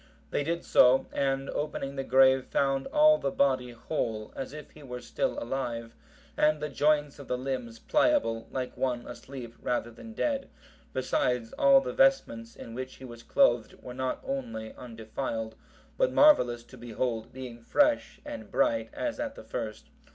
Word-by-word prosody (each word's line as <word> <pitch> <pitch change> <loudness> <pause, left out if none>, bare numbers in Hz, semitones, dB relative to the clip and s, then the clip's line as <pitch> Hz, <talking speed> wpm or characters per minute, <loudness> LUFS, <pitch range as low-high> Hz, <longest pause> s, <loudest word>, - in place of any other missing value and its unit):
They - - 0
did 170 +3 -2
so, 125 +1 +5
and 135 0 0
opening 140 -2 -3
the 135 - -2
grave, 130 +1 +5
found 135 -1 +1
all 305 +1 +5
the 140 - 0
body 130 -2 +1
whole, 115 -3 -3
as 135 - -5
if 150 -1 -10
he 155 - -15
were 125 -3 -7
still 270 - -2
alive, 120 - -3 0.4
and 155 0 +3
the 150 0 -3
joints 145 -1 +1
of 140 - -10
the 125 - -1
limbs 125 -3 -4
pliable, 290 - +1
like 130 -1 -4
one 125 -2 -1
asleep 125 -4 -8
rather 120 -1 -1
than 225 - -11
dead; 275 +3 -1 0.4
besides, 125 -2 0
all 275 -1 +6
the - - -4
vestments 265 - +2
in 115 - -9
which 130 +2 -6
he 130 - -11
was 120 -2 -10
clothed 120 -1 +2
were 125 - -7
not 130 0 -2
only 115 -5 -4
undefiled, 110 -1 -5 0.5
but - - +3
marvellous 125 - +5
to 130 +1 -15
behold, 115 -1 -3
being 125 -2 -8
fresh 290 - +2
and 295 -1 -7
bright 285 0 +1
as 295 0 -3
at 285 -1 -3
the - - -10
first. - - -6
130 Hz, 165 wpm, -29 LUFS, 120-155 Hz, 0.5 s, all